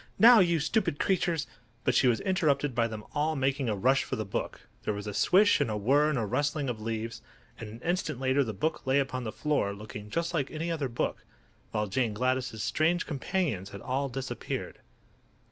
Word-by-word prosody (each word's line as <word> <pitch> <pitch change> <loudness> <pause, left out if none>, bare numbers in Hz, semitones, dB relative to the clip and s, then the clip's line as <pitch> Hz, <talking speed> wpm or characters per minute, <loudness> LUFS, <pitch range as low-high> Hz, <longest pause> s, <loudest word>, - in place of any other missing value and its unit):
Now, 235 0 +9
you 170 -3 +3
stupid 160 0 0
creatures—" 170 -4 +1 0.4
But 130 - +2
she 130 - +4
was 120 -2 +2
interrupted 155 -8 +1
by 115 -1 +2
them 110 -2 -7
all 155 +2 0
making 135 -2 0
a 105 - 0
rush 130 +7 +3
for - - -3
the 110 - -3
book. 95 - -4 0.2
There 105 - -2
was 105 0 -6
a 105 - -4
swish 200 - +4
and 140 - +1
a 105 - -1
whirr 140 +8 +3
and 150 - 0
a 115 - 0
rustling 145 +5 -1
of 110 -3 -4
leaves, 115 +1 -4 0.4
and 110 - -7
an 115 +3 -10
instant 165 -5 -1
later 135 +1 +2
the 115 - -3
book 135 +8 -2
lay 130 +1 +3
upon 130 -3 -1
the 110 - -3
floor 140 -10 0
looking 105 0 -9
just 170 +8 -2
like 145 -5 0
any 165 +2 -3
other 150 -5 -2
book, 115 - -2 0.5
while 105 -1 -1
Jane 110 +2 -1
Gladys' 125 -2 -1
strange 170 +3 +1
companions 145 - -2
had 100 0 -9
all 135 +2 -1
disappeared. 130 +1 -5
135 Hz, 205 wpm, -29 LUFS, 110-155 Hz, 0.5 s, Now